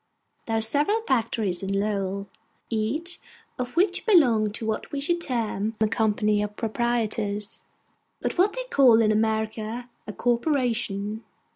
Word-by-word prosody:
There 225 -1 0
are - - +1
several 295 - +3
factories 225 - 0
in 195 0 -1
Lowell, 200 -1 -2 0.4
each 285 +11 -2 0.4
of 250 +2 -4
which 365 +1 +2
belongs 240 - +4
to 225 - -5
what 220 -1 -3
we 285 - -2
should 345 +5 0
term 225 - -2
a 215 - +3
Company 210 -1 +1
of 210 0 -4
Proprietors, 220 -2 -2 0.6
but - - -2
what 385 +3 +3
they - - -3
call 240 -5 +6
in 215 - +3
America 220 +2 -1 0.2
a 210 - -5
Corporation. 235 -5 0
225 Hz, 140 wpm, -25 LUFS, 210-255 Hz, 0.6 s, call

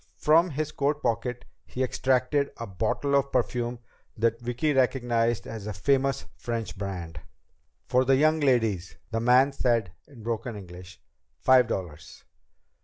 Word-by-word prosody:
From 165 +4 +4
his 155 0 -3
coat 145 +2 -1
pocket 120 +2 -2 0.2
he 130 - -3
extracted 130 +2 +1
a 115 - -5
bottle 110 +8 -2
of 140 0 +2
perfume 120 -1 -1 0.4
that 115 +1 +1
Vicki 125 +5 0
recognized 120 -3 +1
as 110 -2 -7
a 105 - -3
famous 135 +5 +1
French 115 -2 -4
brand. 95 -4 -6 0.7
"For 125 +1 +3
the 135 +1 +4
young 155 +3 +3
ladies," 115 - +1 0.2
the 115 - 0
man 125 +4 +4
said 115 -8 +1 0.2
in 125 -6 -14
broken 115 0 -3
English. 90 -1 -11 0.4
"Five 130 -2 +5
dollars." 85 -8 -6
120 Hz, 140 wpm, -27 LUFS, 110-135 Hz, 0.7 s, Five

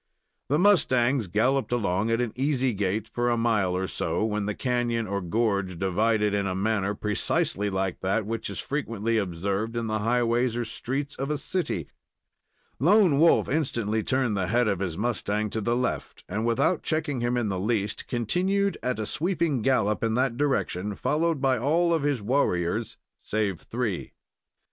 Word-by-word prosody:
The 145 - +3
mustangs 130 - +3
galloped 125 +10 +1
along 110 -2 0
at 115 +1 +1
an 120 -3 -2
easy 130 -1 +1
gait, 100 +2 -1
for 120 +1 -1
a 120 - +1
mile 105 -6 +1
or 95 - -1
so, 105 - -1
when 105 -2 -1
the 105 - -2
canon, 120 -2 0
or 100 -1 -2
gorge, 100 -1 0
divided 105 +3 +1
in 100 -1 0
a 95 - -2
manner 100 0 0
precisely 105 0 0
like 95 -2 -2
that 100 +3 0
which 115 +2 -3
is - - -6
frequently 115 -6 -1
observed 100 +4 -2
in 115 - -1
the 110 -1 -1
highways 120 +1 +1
or 120 - -1
streets 135 +5 -3
of 135 +2 -3
a 150 - 0
city. 140 - -2 0.9
Lone 180 -2 +5
Wolf 165 +2 +5
instantly 115 -7 0
turned 130 -1 0
the 95 -2 -1
head 120 +3 +2
of 100 -4 0
his 90 -4 -3
mustang 105 -2 -1
to 110 - -2
the 120 +3 +1
left, 125 0 -3
and, 110 +5 -2
without 120 +9 +2
checking 155 -5 -1
him 120 +1 0
in 115 -4 0
the 95 -2 -2
least, 105 0 -1
continued 185 - 0
at 125 0 -1
a 110 - -2
sweeping 165 - 0
gallop 110 -5 +1
in 110 -1 +1
that 130 -1 +1
direction, 105 -8 -1
followed 160 - 0
by 130 -2 +2
all 165 +7 +2
of 165 - +1
his 140 -6 0
warriors, 105 -4 0 0.2
save 105 -4 -1
three. 115 -6 -3
115 Hz, 175 wpm, -26 LUFS, 100-130 Hz, 0.9 s, Lone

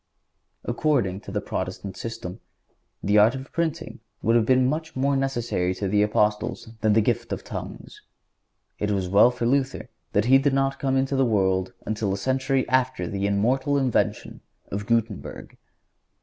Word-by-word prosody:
"According 120 -8 0
to - - -10
the - - -2
Protestant 95 -2 -5
system, 115 -3 -6 0.6
the 105 +2 +4
art 110 +5 +5
of 130 0 -8
printing 160 -7 -3 0.2
would 115 - +3
have 115 -2 +3
been 130 -1 +4
much 160 +4 -2
more 140 +2 +1
necessary 120 -9 -1
to 100 +1 -3
the 105 +2 +2
Apostles 105 +1 0
than 110 -1 +3
the 110 - +4
gift - - -1
of - - -3
tongues. - - -8 0.8
It 105 - -1
was 95 -3 0
well 100 +6 +6
for 125 -1 -3
Luther 135 0 0 0.2
that 105 +2 +2
he 135 +2 +6
did 140 0 +1
not 135 0 0
come 135 -1 +1
into 135 +1 0
the 135 - +3
world 95 -5 +1
until 105 -2 -1
a 95 - -1
century 130 +5 0
after 130 0 +1
the 100 -1 -2
immortal 130 +8 +1
invention 130 -4 -1 0.3
of 100 +1 -4
Guttenberg. 115 -4 -2
120 Hz, 165 wpm, -25 LUFS, 105-135 Hz, 0.8 s, well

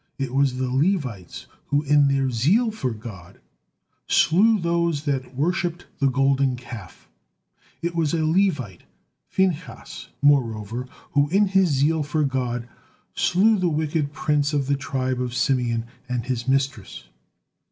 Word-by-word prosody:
It 135 -2 -3
was 135 -2 +2
the 130 0 -1
Levites 130 - -1 0.2
who, 145 +1 +1
in 145 0 +4
their 135 -1 +1
zeal 185 - +2
for 170 -12 -3
God, 105 -6 -10 0.7
slew 205 +9 +4
those 170 -3 0
that 135 -3 -3
worshipped 175 +4 -1
the 140 -2 +3
Golden 135 0 +2
Calf; 115 -7 -11 0.8
it 170 0 -1
was 165 -3 0
a 160 -1 0
Levite, 155 - 0 0.5
Phinehas, 170 -10 -2
moreover, 120 -4 +1 0.2
who 145 0 +2
in 200 +3 +3
his 190 -2 +3
zeal 150 +3 +2
for 150 +1 -1
God 125 -3 -2 0.5
slew 210 +3 +3
the 180 -1 +1
wicked 150 -1 -1
prince 150 0 0
of 140 -2 +1
the 140 +1 +1
tribe 130 -2 -2
of 125 -1 -3
Simeon, 120 -4 0 0.2
and 125 -2 -2
his 120 -2 -3
mistress. 135 -6 -1
140 Hz, 140 wpm, -23 LUFS, 125-160 Hz, 0.8 s, in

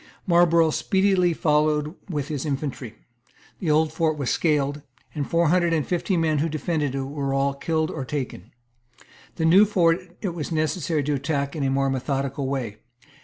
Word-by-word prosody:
Marlborough 170 -2 +4
speedily 190 0 +2
followed 150 -1 +1 0.2
with 145 -5 -2
his 145 -4 -3
infantry. 135 -5 -4 0.6
The 170 - -2
Old 155 0 +2
Fort 160 -2 0
was 140 -4 -1
scaled; 145 -2 0 0.3
and 145 -3 -3
four 170 -1 +2
hundred 175 0 +2
and 155 -3 +1
fifty 180 +1 -1
men 160 -2 +1
who 160 +3 0
defended 150 -2 -2
it 135 - -1
were 140 0 -3
all 140 0 +1
killed 160 +3 -1
or - - -4
taken. 130 -7 -5 0.9
The 160 - -1
New 180 +5 +7
Fort 175 -5 +3 0.2
it 200 - -2
was 165 -1 -5
necessary 155 -1 0
to 150 +2 -1
attack 140 +1 -2
in 155 - -3
a 135 - +1
more 135 0 +1
methodical 135 +1 -2
way. 125 -6 -3
150 Hz, 170 wpm, -24 LUFS, 140-165 Hz, 0.9 s, New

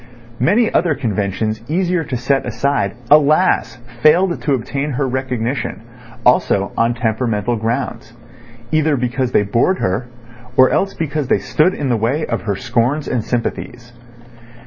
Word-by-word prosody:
Many 215 - +2
other 165 -3 +2
conventions 110 -1 -2
easier 180 +1 0
to 130 -5 -3
set 135 +3 0
aside, 140 -8 -1 0.2
alas! 150 -5 +4 0.3
failed 170 +5 +3
to 145 - 0
obtain 135 +4 -3
her 135 +1 -1
recognition, 125 -2 -3 0.4
also 100 -5 +3
on 115 +1 +1
temperamental 115 -1 -1
grounds—either 120 +4 -3
because 125 +1 -1
they - - +3
bored 115 - +1
her, 105 - -1 0.5
or 130 0 +6
else 195 +1 0
because 150 -3 -2
they - - +3
stood 175 +5 +1
in 140 -3 -2
the 120 - +2
way 130 +8 0
of 115 - -3
her 100 -2 -2
scorns 125 +6 -1
and 120 -4 -1
sympathies. 120 0 -4
125 Hz, 140 wpm, -18 LUFS, 115-145 Hz, 0.5 s, or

